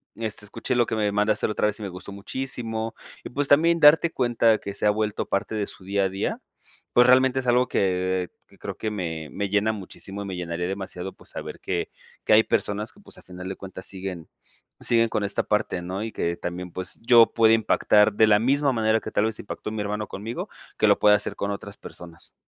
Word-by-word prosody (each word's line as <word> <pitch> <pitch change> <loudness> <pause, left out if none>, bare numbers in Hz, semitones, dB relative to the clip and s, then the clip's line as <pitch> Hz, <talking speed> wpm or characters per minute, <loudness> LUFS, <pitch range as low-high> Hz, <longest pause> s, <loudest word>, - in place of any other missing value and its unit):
este: 110 -2 -3
"Escuché 115 +5 -2
lo 120 -1 +4
que 110 - -3
me 105 -2 +1
mandaste 105 +1 +1
la - - -2
otra 105 - +1
vez 105 - -3
y - - -7
me 100 - -4
gustó 90 +2 -8
muchísimo", 115 +1 -4 0.3
y, - - -7
pues 140 +2 -1
también 165 +4 +4
darte 160 +2 +6
cuenta 120 -4 +2
que 100 - -7
se 100 - -3
ha - - +6
vuelto 105 0 -1
parte 100 +2 -1
de 105 -2 -1
su 95 - -10
día 100 +1 +1
a 95 - +1
día, 95 +1 -3 0.5
pues 120 0 +5
realmente 130 +1 +5
es 130 - -5
algo 125 +1 +3
que 95 -1 0 0.2
que - - -22
creo - - -6
que 110 - -3
me 80 -6 -4
me 100 0 -2
llena 105 +2 +2
muchísimo, 100 -1 -7
y - - -5
me 95 -1 -5
llenaría 90 0 -3
demasiado 95 -1 -5
pues - - -13
saber - - -7
que - - -2 0.4
que - - +4
hay 110 +1 +7
personas 105 +1 -1
que, - - -21
pues, 205 - -14
al - - -15
final 90 0 -9
de 95 - -4
cuentas, 95 -1 -8
siguen 95 -3 -5 0.5
siguen 115 -1 +3
con 105 - -2
esta 100 - 0
parte, 105 -4 -1
¿no? 95 +4 -4
Y 110 - -4
que 85 -4 -2
también 90 +1 -5
pues 90 +1 -5
yo 115 0 +7
pueda 115 -1 +5
impactar 105 -1 +4
de 110 +1 +4
la 105 -1 +5
misma 135 +4 +2
manera 110 -1 +2
que - - -7
tal 105 - +1
vez 110 -1 -2
impactó 105 - -6
mi 110 -1 -3
hermano 105 0 -3
conmigo, 110 +5 -5 0.3
que - - +3
lo - - +4
pueda 105 0 +6
hacer 105 - -3
con 100 - -2
otras 100 - -7
personas. 85 -1 -9
105 Hz, 230 wpm, -25 LUFS, 95-115 Hz, 0.5 s, hay